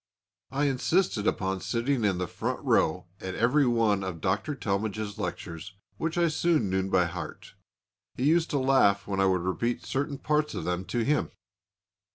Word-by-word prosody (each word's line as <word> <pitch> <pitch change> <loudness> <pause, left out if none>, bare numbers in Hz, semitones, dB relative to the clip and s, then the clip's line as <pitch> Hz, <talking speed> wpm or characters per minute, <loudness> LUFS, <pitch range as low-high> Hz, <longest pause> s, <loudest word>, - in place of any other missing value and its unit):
I 140 +2 0
insisted 135 - +1
upon 95 -1 0
sitting 120 +1 0
in 100 -3 +2
the 90 - -1
front - - -3
row 90 +3 +2
at 95 0 -5
every 130 +5 +3
one 110 -5 +2
of 90 -3 -4
Dr. 105 - -1
Talmage's 105 -1 -2
lectures, 85 +3 -5 0.2
which 165 +1 -2
I 170 -1 +4
soon 155 - +1
knew 95 0 0
by 90 -2 +3
heart. 85 - -7 0.6
He 125 - -3
used 160 +3 +3
to 145 - 0
laugh 130 -7 +3
when 100 -1 -2
I 95 - +4
would 95 -2 +2
repeat 115 +6 -1
certain 140 +1 -2
parts 150 +1 0
of - - -3
them 90 +1 -2
to 120 +2 -1
him. 150 +2 +1
110 Hz, 175 wpm, -28 LUFS, 95-140 Hz, 0.6 s, I